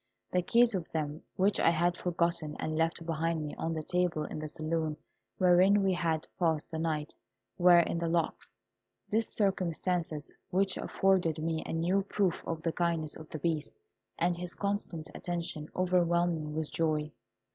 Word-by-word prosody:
The 180 - +2
keys 235 +5 +4
of 180 -4 -3
them, 155 -1 -2
which 195 +2 +2
I - - +5
had 170 +1 +2
forgotten 170 -3 -1
and 155 - -2
left 165 +1 0
behind 165 -1 -1
me 150 - -5
on 165 0 -2
the 155 - -3
table 180 -2 0
in 155 - -5
the 155 - -4
saloon 155 0 -1 0.4
wherein 185 +3 +5
we 190 -1 +3
had 165 -3 -1
passed 160 -3 +1
the 160 - -3
night, 155 -2 -2 0.5
were 175 0 +8
in 170 - -1
the 170 - -1
locks. 165 -1 -1 0.5
This 220 +1 +1
circumstance, 175 -5 -1 0.2
which 190 +1 +1
afforded 185 -5 +1
me 160 0 -1
a - - -3
new 175 +4 +2
proof 195 -2 0
of 165 -1 -3
the 165 - +1
kindness 165 -3 -1
of 160 -1 -11
the - - -5
Beast, 155 - -2 0.4
and 175 +1 +2
his 175 0 -6
constant 200 -6 -3
attention, 170 -3 -4
overwhelmed 175 -1 +2
me 155 -1 -5
with 155 0 -3
joy. 155 -2 0
170 Hz, 170 wpm, -31 LUFS, 160-180 Hz, 0.5 s, were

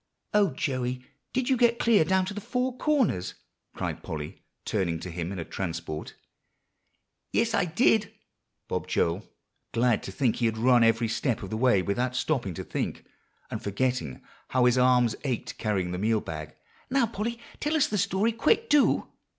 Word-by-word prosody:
"O 205 -2 +4
Joey! 125 -2 -2 0.3
did 255 -1 -1
you 265 - +4
get 235 -1 +3
clear 230 -8 +4
down 190 +3 +2
to 195 - -4
the 210 - -5
Four 250 +3 -1
Corners?" 255 - +1 0.4
cried - - -3
Polly, 75 -2 -6 0.2
turning 90 -6 -1
to 90 +2 -6
him 85 +1 -4
in 100 - -5
a 85 - -4
transport. 80 -4 -5 1.2
"Yes, 230 -1 +1
I 200 -4 +2
did," 210 +4 +2 0.6
bobbed - - -3
Joel, 85 +5 0 0.4
glad 115 -2 +2
to - - -7
think 120 +3 +1
he 120 - +2
had 110 0 -2
run 120 +1 +5
every 115 0 +3
step 115 +1 -1
of 95 - -7
the - - -1
way 110 -5 +3
without 125 +6 -1
stopping 125 - -1
to - - -5
think, - - -4 0.5
and - - -4
forgetting 100 - -2 0.2
how 130 -1 +2
his 125 0 +5
arms 125 -2 +4
ached 130 -5 -3
carrying 95 -5 0
the 90 - -3
meal 110 +2 +2
bag. 75 -4 -7 0.3
"Now, 265 -1 +3
Polly, 230 +1 -3 0.2
tell 300 +2 0
us 305 -2 +4
the 210 -8 -1
story 195 +5 +2
quick, 430 - +1
do." 295 -2 +4
125 Hz, 175 wpm, -27 LUFS, -, 1.2 s, run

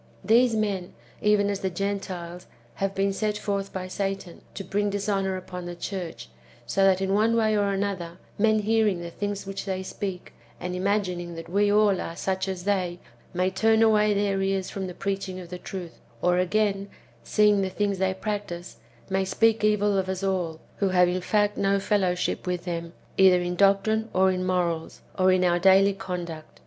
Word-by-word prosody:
These 230 +3 +4
men, 200 -4 -2 0.3
even 210 -1 +3
as 200 - -3
the 190 - -1
Gentiles, 180 -2 -4 0.3
have 195 0 0
been 195 0 +1
sent 210 +1 -1
forth 200 -1 -2
by 185 -1 -5
Satan 195 -2 -4
to 195 - -5
bring 205 +1 0
dishonour 195 -1 -1
upon 180 -1 -7
the 175 - -6
church, 170 - -5 0.4
so 195 +11 +2
that, 190 -1 +4
in 195 0 0
one 220 +3 +3
way 220 -2 +2
or 205 -1 +2
another, 195 -4 -3 0.2
men 215 0 +3
hearing 215 -3 +2
the 170 0 -6
things 205 +2 -4
which 195 0 -5
they 190 -1 -2
speak, 190 -1 -6 0.3
and 180 0 -4
imagining 180 -3 -1
that 165 0 -8
we 205 +3 +2
all 205 -2 +3
are 165 - -5
such 190 +1 -2
as 185 -2 -4
they, 185 -3 0 0.3
may 185 +1 0
turn 220 +3 +3
away 210 -1 +4
their 200 -1 +1
ears 195 -1 -1
from 190 -1 -4
the 180 - -8
preaching 195 -1 -3
of 175 -2 -10
the 180 0 -6
truth; 180 -3 -7 0.2
or, 180 0 +2
again, 200 +1 0 0.3
seeing 210 - +3
the 190 - -1
things 200 0 -1
they 190 0 +2
practise, 190 - -5 0.3
may 190 0 0
speak 225 +3 +2
evil 205 -1 +3
of 190 0 -2
us 190 +1 -3
all, 180 -5 -1 0.2
who 195 - +1
have 180 -1 +4
in 180 +1 -1
fact 205 +2 +1
no 200 0 +2
fellowship 185 -3 0
with 180 -1 -2
them, 170 -1 -4 0.3
either 190 -2 +7
in 175 0 -2
doctrine 200 +4 +3
or 190 0 +4
in 185 0 -2
morals, 175 -3 -1 0.2
or 185 0 +5
in 185 0 +3
our 175 -1 +3
daily 195 +2 +5
conduct. 175 -4 -6
195 Hz, 190 wpm, -26 LUFS, 180-205 Hz, 0.4 s, either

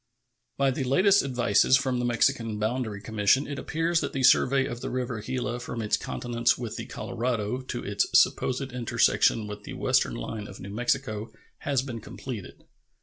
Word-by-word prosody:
By 135 -1 +3
the 135 - -2
latest 190 +10 +4
advices 125 -1 +3
from 130 -2 -1
the 125 - -1
Mexican 120 -2 +1
boundary 110 -1 -2
commission 110 +5 +2
it 140 -2 -5
appears 165 +3 0
that - - -3
the 135 - -2
survey 135 +1 +5
of 120 -3 -5
the - - -4
river 125 -3 -3
Gila 120 +1 -3
from 120 -1 -6
its 105 -2 +1
continence 120 -1 0
with 120 -3 -5
the - - -6
Colorado 120 0 -2
to 125 -1 -5
its 100 0 0
supposed 130 +1 +1
intersection 115 -2 +2
with 105 0 -7
the - - -8
western - - +1
line 105 - -5
of 100 - -11
New 100 - -8
Mexico 120 -2 -1 0.3
has 135 -3 0
been 120 -4 -6
completed. 115 -2 -8
120 Hz, 175 wpm, -27 LUFS, 110-130 Hz, 0.3 s, survey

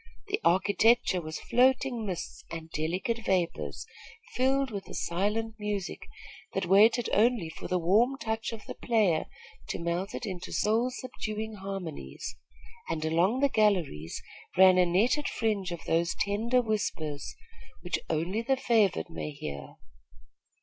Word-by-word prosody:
The 415 +2 -1
architecture 205 +2 +3
was 155 -1 -6
floating 250 -2 +2
mists 180 -3 -5
and 165 -1 -7
delicate 180 +10 -1
vapors, 165 - -1 0.5
filled 265 +1 +2
with 200 -2 -5
a - - -7
silent 210 +6 -1
music, 205 -3 -4 0.5
that 195 -1 -1
waited 215 +6 +5
only 220 -5 +3
for - - -8
the 185 - +1
warm 215 +10 +3
touch 220 -2 -3
of 225 -2 -8
the - - -6
player 210 -9 +2 0.4
to - - -2
melt 170 +4 -2
it - - -4
into 185 -4 -6
soul 225 +4 +2
subduing 220 -4 -5
harmonies; 190 - -6 0.5
and 160 -1 -2
along 180 +11 +2
the 280 - +4
galleries 180 - +1 0.3
ran 185 -1 +7
a 180 - +5
netted 235 - +2
fringe 205 -5 -1
of 170 - -6
those 170 +1 +1
tender 230 +5 +1
whispers, 160 -9 -2 0.5
which 175 -1 -2
only 170 +7 0
the 265 +3 +1
favored 215 - +2
may 80 -2 -4
hear. 70 -1 -7
200 Hz, 140 wpm, -29 LUFS, 170-230 Hz, 0.5 s, ran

